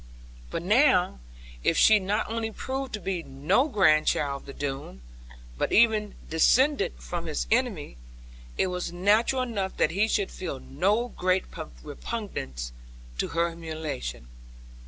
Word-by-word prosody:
But 165 - -4
now, 205 - +4 0.4
if 165 - +2
she 215 -1 +7
not 205 +3 -1
only 225 0 -2
proved 265 +4 -4
to 215 - -3
be 185 -2 -2
no 145 - +1
grandchild 155 - +3
of - - -19
the 140 - -7
Doone, 135 - -5 0.6
but - - 0
even 215 -2 +3
descended 255 - +3
from 170 -1 -5
his 155 - -2
enemy, 220 - 0 0.6
it - - +3
was 180 -2 -3
natural 210 +8 +2
enough 200 -6 -3
that 155 - +2
he 200 +5 +2
should 205 -3 0
feel 165 -7 -5
no 200 - 0
great 185 -3 0 0.4
repugnance 145 - -5 0.5
to - - +1
her 170 +1 0
humiliation. 155 - -5
185 Hz, 135 wpm, -27 LUFS, 155-220 Hz, 0.6 s, she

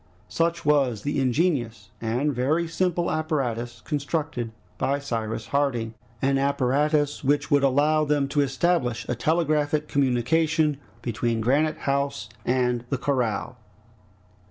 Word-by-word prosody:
Such 170 0 0
was 135 -7 +2
the 145 0 -1
ingenious 125 - 0
and 125 +6 0
very 150 +7 +1
simple 175 +1 0
apparatus 120 -7 -2
constructed 145 -5 -2 0.3
by 140 +1 +1
Cyrus 115 -5 -3
Harding, 125 -6 0 0.3
an 135 0 +3
apparatus 140 +2 +1
which 145 +1 +1
would 145 -1 +5
allow 145 +3 +3
them 145 -2 +1
to 145 0 +2
establish 135 -2 0
a - - 0
telegraphic 150 +1 +1
communication 150 +4 +2 0.3
between 115 -1 -1
Granite 145 +7 +2
House 140 -5 -1 0.2
and 125 -1 +1
the 135 - 0
corral. 125 -5 -1
140 Hz, 120 wpm, -25 LUFS, 125-150 Hz, 0.3 s, would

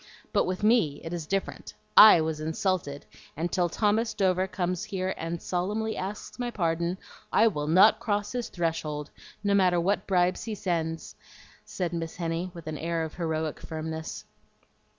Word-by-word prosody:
But - - +3
with 185 +2 -3
me 210 -11 +3
it 165 - -5
is 165 -3 -4
different. 195 +2 -3 0.2
I 210 -6 +10
was 160 -1 -2
insulted, 160 -2 -2 0.3
and 170 +2 -2
till 175 -2 +1
Thomas 215 +4 +1
Dover 190 -2 +2
comes 180 -2 -2
here 190 -1 -2
and 165 +1 -4
solemnly 210 +6 -2
asks 200 +5 -6
my 245 -1 -1
pardon 170 -3 -1 0.3
I 220 - +5
will 150 -9 0
NOT 185 +6 +6
cross 205 -2 -1
his 245 -2 -3
threshold, 155 -4 -3 0.3
no 200 -1 +2
matter 185 -3 +4
what 195 +4 0
bribes 180 +1 +1
he 220 -2 -3
sends," 165 -4 -2 0.5
said 180 -2 -3
Miss 165 -1 -4
Henny, 170 +1 -2
with 170 -2 -9
an 155 -1 -5
air 165 0 -1
of 160 - -5
heroic 160 -2 -2
firmness. 160 0 -6
175 Hz, 165 wpm, -27 LUFS, 160-200 Hz, 0.5 s, I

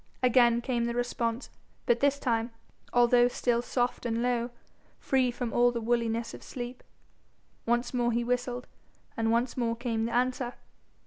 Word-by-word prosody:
Again 240 -1 +5
came 240 -2 -1
the 235 0 -2
response, 240 0 -2 0.3
but 235 0 +3
this 280 +1 +3
time, 230 -4 0 0.4
although 245 0 +5
still 240 -1 0
soft 245 0 -1
and 230 -1 -1
low, 245 -1 0 0.5
free 260 -2 +1
from 240 -1 -4
all 245 0 +5
the 235 - -3
woolliness 230 0 -1
of - - -9
sleep. 245 0 -7 0.9
Once 240 +2 +1
more 240 -1 +1
he 235 +1 0
whistled, 245 0 -2 0.5
and 225 0 0
once 235 +2 +1
more 235 -2 0
came 230 -2 -2
the 230 - -3
answer. 250 0 0
240 Hz, 155 wpm, -29 LUFS, 235-245 Hz, 0.9 s, Again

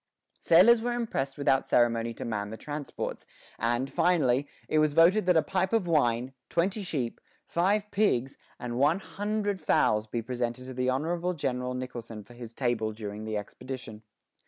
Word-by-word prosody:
Sailors 235 -1 +6
were 240 +1 -1
impressed 140 - -2
without 135 -2 +2
ceremony 115 -1 +2
to - - -6
man 105 -3 -3
the 110 - -7
transports; 145 +1 -5 0.3
and, 120 +3 0
finally, 140 -6 +2 0.2
it 155 - +2
was 155 -1 +3
voted 180 +5 +5
that 180 -2 +5
a 160 - +4
pipe 190 +5 -1
of 225 -5 +2
wine, 130 -6 +1 0.2
twenty 190 +5 0
sheep, 135 -11 -3 0.2
five 200 +4 +1
pigs, 135 - +1 0.2
and 120 0 -4
one 150 +5 +4
hundred 205 0 -2
fowls 105 0 +2
be 115 +1 -3
presented 125 +1 -3
to 130 - -7
the 125 0 0
Honorable 170 +7 -1
General 125 -3 -2
Nicholson 115 -4 -6
for 120 - -16
his 120 -2 -9
table 120 -3 -1
during 105 0 -6
the 110 -1 -2
expedition. 115 +1 -7
130 Hz, 165 wpm, -28 LUFS, 120-175 Hz, 0.3 s, Sailors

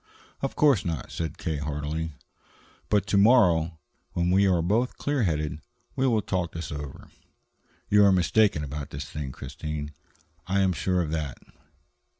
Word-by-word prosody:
"Of 135 - -2
course 140 -9 +4
not," 80 -8 -4
said 80 -4 -4
K. 80 -2 -2
heartily. 75 +2 -3 0.8
"But 105 -2 +2
to 100 - +1
morrow, 90 -8 +4 0.4
when 85 0 +1
we 100 +2 +4
are 90 -3 +2
both 110 +8 +1
clear 145 -2 0
headed, 75 -6 -1 0.4
we 130 - +2
will 110 -4 +2
talk 90 -3 -2
this 85 -3 -5
over. 75 -2 -7 0.8
You 105 0 +5
are 100 - +6
mistaken 95 -1 +3
about 70 0 -5
this 70 +1 -6
thing, 75 -3 -5
Christine; 75 +3 -6 0.5
I 95 +1 +2
am 95 -1 +3
sure 90 +1 0
of 75 - -4
that. 75 -5 -3
85 Hz, 155 wpm, -27 LUFS, 75-100 Hz, 0.8 s, are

